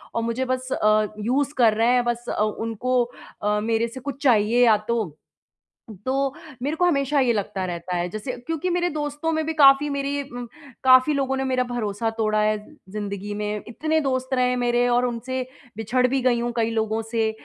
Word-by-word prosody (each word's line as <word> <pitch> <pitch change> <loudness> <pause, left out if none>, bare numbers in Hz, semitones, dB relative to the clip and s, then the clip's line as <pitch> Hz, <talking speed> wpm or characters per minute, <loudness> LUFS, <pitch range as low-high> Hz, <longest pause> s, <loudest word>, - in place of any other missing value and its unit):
और 230 - +1
मुझे 235 +3 -1
बस 255 0 -2
अ, 215 0 +3
यूज़ 270 +6 0
कर 230 -3 +5
रहे 225 +2 +2
हैं, 245 -1 +3
बस 240 0 -2
अ, - - -1
उनको 230 +3 0 0.4
अ, 210 0 +1
मेरे 230 +1 +1
से 255 +3 -9
कुछ 280 +2 -6
चाहिए 240 0 +4
या 220 -2 +5
तो। 215 -10 -1 0.9
तो 270 +1 0 0.3
मेरे 295 +3 -1
को 355 - +2
हमेशा 280 -3 +2
ये 240 -2 +3
लगता 195 -2 -2
रहता 175 0 -4
है 175 0 -1
जैसे 215 +6 -5 0.2
क्योंकि 325 +2 -1
मेरे 350 0 +1
दोस्तों 295 +1 -2
में 315 -1 -1
भी 320 - -2
काफ़ी 275 +1 +7
मेरी 280 0 -2
उम, 245 -2 -7 0.4
काफ़ी 255 +3 +6
लोगों 270 -1 0
ने 265 - -1
मेरा 255 -1 +1
भरोसा 225 -3 -2
तोड़ा 215 -1 +1
है 215 0 +2 0.4
जिंदगी 205 -1 -4
में, 210 0 -3
इतने 315 +7 0
दोस्त 260 -1 -1
रहे 250 -1 +3
हैं 250 - 0
मेरे 240 0 +2
और 245 +1 +3
उनसे 250 +2 -3 0.4
बिछड़ 250 +4 +1
भी 265 +1 0
गई 245 -2 +2
हूँ 240 0 -1
कई 225 0 +2
लोगों 220 0 -1
से। 225 -1 +1
245 Hz, 200 wpm, -23 LUFS, 220-270 Hz, 0.9 s, काफ़ी